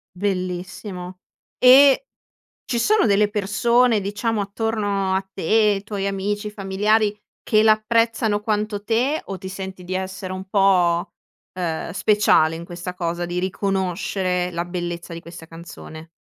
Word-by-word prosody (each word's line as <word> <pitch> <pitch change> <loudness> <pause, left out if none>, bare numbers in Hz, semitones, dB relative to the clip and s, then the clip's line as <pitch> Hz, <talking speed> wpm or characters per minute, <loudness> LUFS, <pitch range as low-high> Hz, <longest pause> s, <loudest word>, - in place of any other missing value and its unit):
Bellissimo. 180 -1 -4 0.4
E 275 - +7 0.6
ci 240 - -2
sono 425 - +3
delle 205 0 +3
persone 220 +3 +2
diciamo 205 +3 -2
attorno 205 -2 -1
a 190 0 -2
te, 205 +2 +2
tuoi 200 -2 -3
amici, 205 +2 -2
familiari 210 +1 +1 0.2
che 215 -1 +3
l'apprezzano 220 0 +2
quanto 210 -1 -2
te 250 +8 +1
o 195 - -6
ti 190 +1 -7
senti 190 -1 -7
di 185 +1 -5
essere 190 0 -5
un 185 0 -6
po', 180 -4 +2 0.4
ehm, 170 -3 -3
speciale 190 -5 +3
in 165 - -7
questa 175 +1 -7
cosa 175 -1 -3
di 175 +1 -2
riconoscere 185 -1 -1
la 170 0 -2
bellezza 175 -1 -5
di 165 - -6
questa 170 -1 -11
canzone? 165 -1 -11
195 Hz, 135 wpm, -22 LUFS, 180-215 Hz, 0.6 s, E